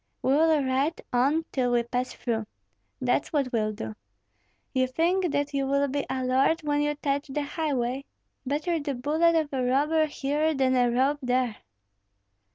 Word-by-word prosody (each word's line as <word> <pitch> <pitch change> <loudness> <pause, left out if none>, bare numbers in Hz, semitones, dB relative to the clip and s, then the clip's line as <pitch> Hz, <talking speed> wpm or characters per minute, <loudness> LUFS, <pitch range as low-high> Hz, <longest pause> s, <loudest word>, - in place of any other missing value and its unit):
"We 265 - +3
will 310 0 +4
ride 270 +5 0
on 280 +7 +2
till 250 -2 0
we 240 -1 +3
pass 250 +1 -2
through, 225 -3 -3 0.5
that's - - 0
what 275 -5 0
we'll 215 -2 +1
do! 110 - -6 0.8
You 260 -1 +2
think 345 +6 +1
that 285 0 -1
you 275 -1 0
will 280 +1 +2
be 280 +1 -2
a 260 0 -2
lord 265 +6 +2
when 290 -1 +1
you 295 0 0
touch 285 0 -2
the 290 +2 -2
highway? 275 -4 -2 0.4
Better 300 +5 -1
the 285 -2 -3
bullet 315 +6 +2
of 310 -3 0
a 265 - 0
robber 300 +5 +2
here 295 +2 0
than 260 -1 +2
a 245 -1 +3
rope 265 +4 +1
there." 250 -3 0
275 Hz, 170 wpm, -27 LUFS, 255-300 Hz, 0.8 s, will